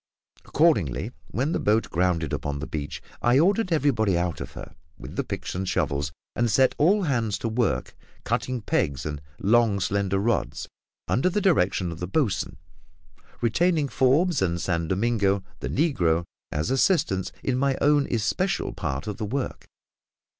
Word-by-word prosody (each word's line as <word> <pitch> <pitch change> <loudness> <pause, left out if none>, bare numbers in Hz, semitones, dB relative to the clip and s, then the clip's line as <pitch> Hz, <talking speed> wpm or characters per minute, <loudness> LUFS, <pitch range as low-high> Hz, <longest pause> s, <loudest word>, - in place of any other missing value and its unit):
Accordingly, 110 - +2 0.2
when 130 - -1
the - - 0
boat 110 +2 +1
grounded 85 -3 0
upon 70 0 -2
the 75 - -4
beach, 75 -2 -5 0.2
I 120 +2 +4
ordered 190 +5 +3
everybody 120 - +2
out 85 -1 -2
of - - -7
her, - - -9 0.2
with - - -9
the - - 0
picks - - -5
and 95 +1 -2
shovels, 75 -5 0 0.2
and 120 0 +1
set 130 +5 +4
all 195 +7 +4
hands 115 - 0
to - - -3
work 115 +2 -1 0.3
cutting 130 -2 -1
pegs 70 -9 -1
and 75 -1 -4 0.2
long 110 -1 +3
slender 100 0 0
rods, 110 +4 -1 0.4
under 125 - +2
the 195 - 0
direction 95 - +2
of 80 - -8
the 90 - -3
boatswain, 115 - -1 0.8
retaining 155 +5 +2
Forbes 145 +6 +3
and 85 -2 0
San 85 -2 -1
Domingo, 100 -1 +1 0.2
the - - -4
negro, 90 - +1 0.3
as 75 +7 -1
assistants 135 - +2
in 130 - 0
my 135 0 +1
own 145 -1 +3
especial 125 - 0
part 70 -3 -3
of 105 -2 -4
the 110 - -3
work. 130 +5 -4
110 Hz, 160 wpm, -25 LUFS, 90-140 Hz, 0.8 s, I